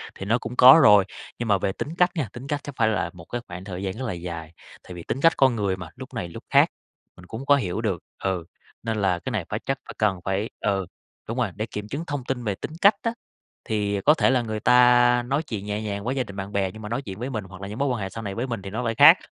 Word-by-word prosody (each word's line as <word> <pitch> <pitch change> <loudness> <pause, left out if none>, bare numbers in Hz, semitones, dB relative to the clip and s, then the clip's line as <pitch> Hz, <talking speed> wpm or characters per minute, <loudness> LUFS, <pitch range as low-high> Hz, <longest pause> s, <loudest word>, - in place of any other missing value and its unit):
thì 95 - -7
nó 115 +4 +2
cũng 120 0 -7
có 130 +5 +9
rồi. 105 -4 +7 0.3
Nhưng 120 - -2
mà 100 -2 +4
về 95 - -1
tính 105 - -5
cách 180 0 +4
nha, 145 - -2
tính 125 +3 -8
cách 145 -1 -1
chắc 145 - -8
phải 115 - +3
là 105 -6 0
một 85 -2 -12
cái 120 +6 -4
khoảng 90 +1 -8
thời 95 -1 -6
gian 95 -1 -2
rất 130 - -5
là 110 - -2
dài, 85 -2 -7 0.3
tại 90 - -10
vì 85 -1 -8
tính 130 - -3
cách 165 +1 +6
con 130 -3 +4
người 100 -4 -1
mà, 90 -3 -8
lúc 130 +1 -10
này 95 -8 -4
lúc - - -10
khác, - - +5 0.5
mình 90 - -14
cũng 110 +8 -7
có 145 - +6
hiểu 105 -6 -2
được 100 -7 -2 0.2
ừ, 95 -3 -1 0.4
nên 110 -1 -2
là 90 -3 +2
cái - - -5
này - - -2
phải - - -2
chắc - - 0
phải - - -9
cần 100 -4 +1
phải 100 +3 -1
ừ, 100 -2 0 0.4
đúng 115 - -4
rồi, 120 -6 0
để 110 - -2
kiểm 105 -2 -6
chứng 145 +8 -4
thông 145 -3 -3
tin 125 -2 -3
về 105 -4 -1
tính - - -7
cách 200 +2 +7
á. 230 - -1 0.5
Thì 100 -2 -1
có 150 - +6
thể 155 - +3
là 130 -1 +3
người 110 -2 -4
ta 125 +1 +5
nói 140 +4 0
chuyện 110 -9 -5
nhẹ 105 +1 -3
nhàng 100 -2 -4
với 125 +4 -2
gia 130 - 0
đình 100 - -11
bạn 100 0 -5
bè, 100 -2 0
nhưng 110 - -11
mà 105 - -6
nói 120 +4 -2
chuyện 100 -7 -8
với 125 +3 -3
mình 110 -6 -3
hoặc 95 0 -12
là 100 - -5
những 105 +5 -7
mối 140 - +1
quan 120 -4 -1
hệ 95 - -3
sau 115 +4 -7
này 100 -2 -4
với 120 +3 -2
mình 115 -5 -4
thì 95 - -7
nó 110 +5 -3
lại 115 -2 -1
khác, - - +9
110 Hz, 300 wpm, -24 LUFS, 95-125 Hz, 0.5 s, có